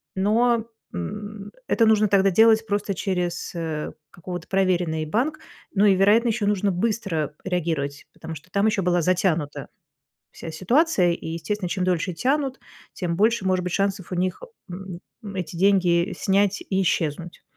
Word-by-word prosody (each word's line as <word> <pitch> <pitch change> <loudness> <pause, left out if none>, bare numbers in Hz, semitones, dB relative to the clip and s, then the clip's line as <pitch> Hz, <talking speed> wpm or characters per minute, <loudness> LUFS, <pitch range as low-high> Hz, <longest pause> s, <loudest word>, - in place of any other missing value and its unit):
Но, 225 +4 +2 0.3
м, 205 - -6 0.2
это 230 - +3
нужно 215 -1 +4
тогда 195 -1 +3
делать 220 +3 +5
просто 205 -1 -1
через, 180 -3 -2
э, 160 -2 -3 0.2
какого-то 175 -1 -7
проверенный 180 -5 +1
банк. 265 - -1 0.4
Ну 200 +1 +4
и, 200 - +6
вероятно, 210 +5 +4
ещё 215 -2 0
нужно 205 -1 +1
быстро 180 -7 -1
реагировать, 160 -6 -2
потому 165 - -8
что 155 +4 -13
там 200 +1 +1
ещё 200 -3 +1
была 175 -1 +2
затянута 170 -4 0 0.6
вся 165 - -8
ситуация. 190 - +2
И, 170 - -5
естественно, 170 +4 -3
чем 185 0 -1
дольше 180 0 0
тянут, 270 - 0 0.3
тем 170 -3 -2
больше 220 -1 +2
может 185 -1 +1
быть 180 -1 -3
шансов 195 -2 -1
у - - -2
них, 185 +1 -1 0.3
м, 180 -1 -7 0.2
ну, 200 -2 -8
эти 180 -2 -4
деньги 185 -1 +3
снять 200 +1 +1
и 190 0 -1
исчезнуть. 170 -1 -1
190 Hz, 155 wpm, -24 LUFS, 175-210 Hz, 0.6 s, и